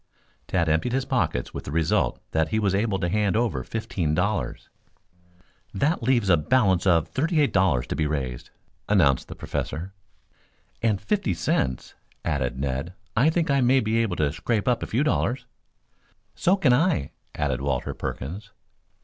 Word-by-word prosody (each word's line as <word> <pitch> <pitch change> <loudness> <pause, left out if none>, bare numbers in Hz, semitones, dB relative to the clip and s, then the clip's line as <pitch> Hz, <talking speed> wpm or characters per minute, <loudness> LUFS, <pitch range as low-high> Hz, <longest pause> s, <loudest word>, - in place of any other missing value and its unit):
Tad 85 -3 +1
emptied 80 +10 +1
his 135 0 0
pockets 85 - -1
with - - -5
the - - -6
result 85 +6 +1
that 80 0 +1
he 95 - -1
was 100 -3 +1
able 100 0 +1
to 90 -2 -1
hand 105 +1 +1
over 115 - 0
fifteen 100 - -2
dollars. 90 - -1 1.1
"That 150 - +1
leaves 120 -3 +2
a 90 -3 +5
balance 95 +1 +2
of 85 -3 +4
thirty 155 - 0
eight 145 - +2
dollars 90 -11 +2
to - - -4
be 80 - 0
raised," 65 -5 -3 0.4
announced 75 -11 +3
the - - -8
Professor. 90 +5 -4 0.9
"And 110 -4 +1
fifty 105 - -1
cents," 65 -6 -1 0.3
added 65 -5 -1
Ned. 70 +6 -3 0.2
"I 130 +7 +4
think 160 -2 +1
I 140 -1 +3
may 130 +2 +4
be 110 -1 +1
able 110 -6 0
to 75 -3 0
scrape 105 +5 -1
up 125 -2 +2
a - - -3
few 125 +6 +1
dollars." 135 -4 0 0.9
"So 185 +3 +2
can 140 -10 +4
I," 135 - +1 0.2
added 65 -4 -1
Walter 70 0 -1
Perkins. 95 - -6
95 Hz, 165 wpm, -25 LUFS, 80-120 Hz, 1.1 s, a